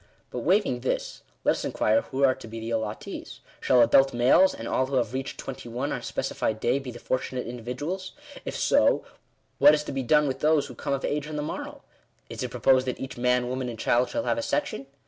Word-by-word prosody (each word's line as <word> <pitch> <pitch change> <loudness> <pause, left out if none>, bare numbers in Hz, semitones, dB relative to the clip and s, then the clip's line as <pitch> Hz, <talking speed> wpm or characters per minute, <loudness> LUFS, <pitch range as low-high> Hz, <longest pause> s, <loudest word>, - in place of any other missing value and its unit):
But, - - -3
waiving - - +2
this, - - -3 0.2
let - - +4
us - - -2
inquire 285 - +2
who 135 - -3
are 130 -1 +6
to 115 - -11
be 115 +1 -7
the 115 +1 -5
allottees. 110 -2 -4 0.2
Shall 125 -2 +5
adult 135 +3 +4
males, 130 +10 +5
and 115 - -7
all 130 - +1
who 135 - -3
have 120 -2 0
reached 135 +1 -4
twenty 125 -2 -7
one 125 +5 -3
on - - -2
a - - -13
specified 110 0 -2
day, 125 +5 +1
be 135 -2 -7
the 120 - -8
fortunate 130 +1 -2
individuals? 125 +11 -5 0.3
If - - -4
so, - - +3 0.5
what 145 +2 +8
is 150 - -2
to - - -6
be 135 - -2
done 150 +4 +3
with 135 0 -2
those 150 -1 +3
who 125 - -9
come 130 - -3
of 135 - -2
age 150 0 -2
on 155 - -6
the 150 - -2
morrow? 150 - -6 0.5
Is - - -6
it - - -2
proposed 130 -1 +3
that 125 - -3
each 135 - -6
man, 125 0 +1
woman, 130 0 -3
and 115 - -6
child, 120 +3 +2
shall 290 - -2
have 290 - 0
a - - -1
sec 295 +1 0
tion 135 - -7
130 Hz, 240 wpm, -26 LUFS, 120-145 Hz, 0.5 s, what